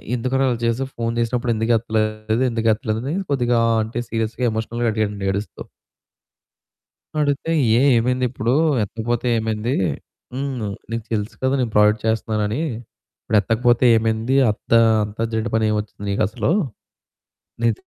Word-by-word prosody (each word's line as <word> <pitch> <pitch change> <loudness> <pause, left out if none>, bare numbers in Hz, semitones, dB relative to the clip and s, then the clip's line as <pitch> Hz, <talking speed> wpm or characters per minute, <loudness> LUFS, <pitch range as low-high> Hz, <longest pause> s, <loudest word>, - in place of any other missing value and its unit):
"ఎందుకురా 130 +3 0
అలా 120 -2 0
చేసావు 130 +3 -1
ఫోన్ 115 0 -1
చేసినప్పుడు 120 +1 0
ఎందుకు 115 +2 0
ఎత్తలేదు? 110 +1 -1
ఎందుకు 115 -1 -1
ఎత్తలేదు?" 110 0 -3
అని - - -1 0.2
కొద్దిగా 120 -3 +2 0.2
అంటే 115 +2 -4
సీరియస్‍గా 115 +2 -2
ఎమోషనల్‍గా 115 +2 -2
అడిగాండీ 105 -2 -2
ఏడుస్తూ. 100 +2 -5 1.6
అడిగితే 145 +3 -1 0.3
ఏ - - +3 0.2
ఏమైంది 125 +2 0
ఇప్పుడు 120 -1 -1 0.3
ఎత్తకపోతే 115 +4 -2
ఏమైంది? 110 +3 -1 0.6
హ్మ్, 135 -3 -3 0.3
నీకు 115 -1 -3
తెలుసు 105 -1 -2
కదా! 130 +1 +2
నేను 120 -3 -1
ప్రాజెక్ట్ 105 +1 +4
చేస్తున్నానని 110 +2 0 0.6
ఇప్పుడు 110 - 0
ఎత్తకపోతే 120 +4 +2
ఏమైంది? 110 +4 0
అత్త 105 - -8 0.3
అంతర్జెంట్ 110 +2 -3
పని 110 -1 +2
ఏమి 105 - +1
వచ్చింది 105 -1 -10
నీకసలు? 105 - 0 1.1
నీకు 115 -2 +3
115 Hz, 130 wpm, -21 LUFS, 110-120 Hz, 1.6 s, ప్రాజెక్ట్